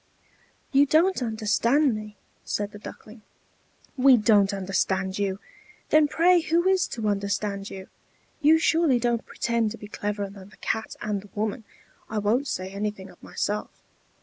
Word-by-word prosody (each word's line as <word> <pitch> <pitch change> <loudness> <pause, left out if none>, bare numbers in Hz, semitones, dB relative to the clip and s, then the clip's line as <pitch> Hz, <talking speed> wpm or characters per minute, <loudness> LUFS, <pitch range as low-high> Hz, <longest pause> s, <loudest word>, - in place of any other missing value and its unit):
"You 280 +1 +5
don't 335 +3 +3
understand 230 +5 +2
me," 215 -1 -7 0.3
said 205 0 -3
the 210 - -11
Duckling. 215 +2 -11 0.7
"We 265 -1 +6
don't 210 -2 +4
understand 190 0 -1
you! 195 -2 -1 0.5
Then 305 -1 +5
pray 345 +4 +4
who 335 +3 +1
is 380 -1 +3
to 225 -2 -4
understand 200 0 -2
you? 190 -1 -9 0.5
You 310 +2 +6
surely 320 -4 +3
don't 235 -1 -1
pretend 235 -2 0
to 230 - -8
be 210 - -10
cleverer 205 -1 -4
than 195 -1 -12
the - - -19
Cat 220 0 -3
and 210 -2 -2
the 205 - -16
woman 215 +2 -2 0.4
I 220 - -3
won't 225 +7 +1
say 185 -6 -4
anything 200 -1 -4
of - - -21
myself. 210 +1 -3
215 Hz, 155 wpm, -25 LUFS, 200-265 Hz, 0.7 s, We